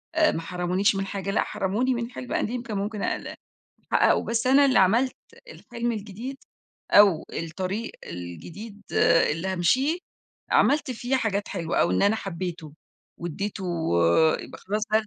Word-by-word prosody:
آآ 315 -1 +4
ما 165 - -3
حرمونيش 180 +3 0
من 195 0 -1
حاجة، 195 0 -4
لأ - - +2
حرموني 220 +7 -1
من 235 0 -3
حِلم 250 - -6
قديم 240 +2 -1
كان 215 -4 -4
ممكن 205 +1 -3
أقل - - -3 0.6
أحقّقه - - +4
بس 235 +1 -1
أنا 275 +2 +6
اللي 260 -6 +4
عملت 230 +8 +3 0.3
الحلم 240 - -4
الجديد 220 +5 -6 0.5
أو 200 -6 +6
الطريق 185 +7 -4
الجديد، 90 - -8 0.5
اللي 165 +5 -2
هامشِيه، 260 - +2 0.5
عملت 290 -2 +3
فيه 250 +2 -1
حاجات 205 -4 -1
حلوة 170 -4 -1
أو 85 - +3
إن 90 - +1
أنا 210 +2 +3
حبّيته 175 -5 -5 0.5
وادّيته 190 +4 -4 0.8
يبقى - - -10
خلاص 210 +2 -3
ده 215 0 +3
205 Hz, 145 wpm, -25 LUFS, 185-235 Hz, 0.8 s, أنا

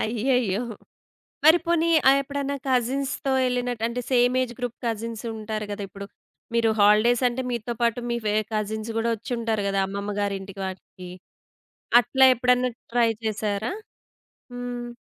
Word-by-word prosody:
అయ్యయ్యో! 235 -2 0 0.8
మరి 320 +3 +8
పోనీ 335 -1 +2 0.2
ఆ - - +10
ఎప్పుడన్నా 280 0 -3
కజిన్స్‌తో 265 +2 0
యెళ్ళినట్టు 245 -2 -1
అంటే 245 +1 -3
సేమ్ 245 0 +3
ఏజ్ 245 - -4
గ్రూప్ 245 -1 -4
కజిన్స్ 230 0 -3
ఉంటారు 215 -1 -4
గదా 205 0 -4
ఇప్పుడు. 200 +1 -9 0.5
మీరు 230 -1 +3
హాలిడేస్ 215 +4 +5
అంటే 250 +2 -3
మీతో 240 0 -3
పాటు 235 0 +1
మీ 235 - 0
వేరె 210 +1 +2
కజిన్స్ 215 +1 -2
గూడా 230 +1 +1
వోచ్చుంటారు 225 -1 -2
గదా 195 0 +1
అమ్మమ్మ 200 +1 -4
గారింటికి 195 -1 -4
వాటికి. 185 -1 -9 0.9
అట్లా 265 +3 +4
ఎప్పుడన్నా 250 +1 +2 0.2
ట్రై 240 -1 +4 0.2
చేసారా? 215 0 -1 0.8
హ్మ్. 245 0 -5
235 Hz, 135 wpm, -25 LUFS, 210-250 Hz, 0.9 s, ఆ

